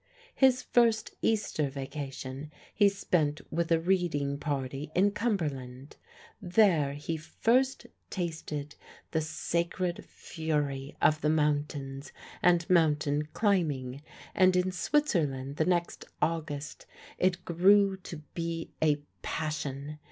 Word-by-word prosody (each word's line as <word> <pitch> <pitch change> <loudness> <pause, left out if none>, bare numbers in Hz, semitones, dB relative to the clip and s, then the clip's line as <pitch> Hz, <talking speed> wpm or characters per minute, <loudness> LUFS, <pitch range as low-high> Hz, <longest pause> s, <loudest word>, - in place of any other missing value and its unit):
His 255 -1 +4
first 230 -3 +2
Easter 205 -9 +1
vacation 135 0 -6 0.2
he 205 -2 +5
spent 160 -6 0
with 170 +1 -1
a 165 - +5
reading 165 -6 0
party 140 0 -3
in 195 +3 +4
Cumberland. 145 - -3 0.4
There 175 -7 +3
he 150 +3 -4
first 240 - +1 0.2
tasted 155 -5 -4 0.4
the 160 - +1
"sacred 170 +3 -2
fury" 145 -4 -3
of 155 0 +4
the 150 - +2
mountains 145 -2 -1 0.3
and 175 -1 +4
mountain 150 -4 +2
climbing, 145 - 0 0.3
and 185 -1 +4
in 180 +1 +2
Switzerland 155 - 0
the 155 - +2
next 175 -1 0
August 155 -3 -3 0.3
it 185 -1 +1
grew 195 +3 +5
to 170 -4 -9
be 165 -1 -4
a 150 -2 +2 0.2
passion. 150 -1 -4
160 Hz, 110 wpm, -30 LUFS, 145-180 Hz, 0.4 s, he